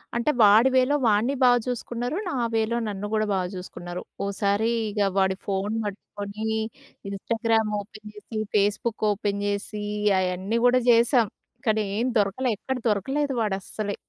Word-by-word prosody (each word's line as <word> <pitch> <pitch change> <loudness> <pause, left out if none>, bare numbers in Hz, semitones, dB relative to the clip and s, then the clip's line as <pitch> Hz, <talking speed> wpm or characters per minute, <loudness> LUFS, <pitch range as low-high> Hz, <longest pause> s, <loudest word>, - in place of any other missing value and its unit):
అంటే 235 +6 +2
వాడి 215 +5 +7
వేలో 260 +3 +4
వాడ్ని 220 +6 +3
బాగా 245 -1 +6
చూసుకున్నారు. 245 +1 -3
నా 350 - -2 0.2
వే‌లో 225 +1 +1
నన్ను 205 0 -4
కూడా 215 0 +2
బాగా 185 -2 0
చూసుకున్నారు. 175 -1 -7 0.2
ఒకసారి 200 +2 0 0.2
ఇగ 210 0 -4 0.2
వాడి 190 0 +3
ఫోన్ 200 +2 -1
పట్టుకొని 205 +1 -6 0.6
ఇన్స్టాగ్రామ్ 225 +2 0
ఓపెన్ 215 +1 -10
చేసి, 210 +1 -8 0.2
ఫేస్బుక్ 210 +2 +1
ఓపెన్ 200 0 -2
చేసి 205 +1 -3 0.4
అయన్నీ 185 +5 -1
కూడా 250 +1 +5
చేసాం. 235 0 +5 0.4
కానీ 215 0 +3 0.2
ఏమి 245 +3 +1
దొరకలేదు. 210 +4 +1
ఎక్కడ 265 +4 -3
దొరకలేదు 270 +8 0
వాడు 210 -3 0
అస్సలె. 205 +1 -4
215 Hz, 140 wpm, -25 LUFS, 200-235 Hz, 0.6 s, వాడి